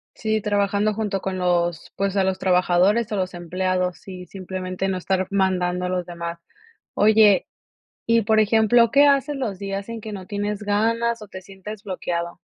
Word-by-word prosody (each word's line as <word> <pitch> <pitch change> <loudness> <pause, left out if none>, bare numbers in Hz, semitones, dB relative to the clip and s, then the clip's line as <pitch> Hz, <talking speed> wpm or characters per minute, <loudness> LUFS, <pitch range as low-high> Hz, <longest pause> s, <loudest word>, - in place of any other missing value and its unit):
Sí, 220 0 -1
trabajando 205 0 +1
junto 205 -3 -2
con 190 -1 -3
los, 175 -2 0
pues, 195 0 -1
a 195 - +3
los 190 0 0
trabajadores, 185 +5 +2
o - - -1
los 185 -1 -2
empleados, 180 +1 -2
y 180 -1 -8
simplemente 185 0 -4
no 190 - -1
estar 185 0 -1
mandando 180 -2 0
a - - -2
los 180 -1 -2
demás. 170 -1 -6 0.5
Oye, 210 -2 +5 0.6
y 230 0 +3
por 220 +1 +3
ejemplo, 220 +2 +4
¿qué 285 +3 +6
haces 280 +1 +2
los 220 -8 -3
días 195 +1 -5
en 230 -1 -5
que 215 0 -7
no 190 -2 -7
tienes 205 +1 -3
ganas, 230 +3 0
o 210 - -10
te 185 -1 -9
sientes 195 +2 -10
bloqueado? 175 -3 -4
195 Hz, 175 wpm, -23 LUFS, 185-215 Hz, 0.6 s, qué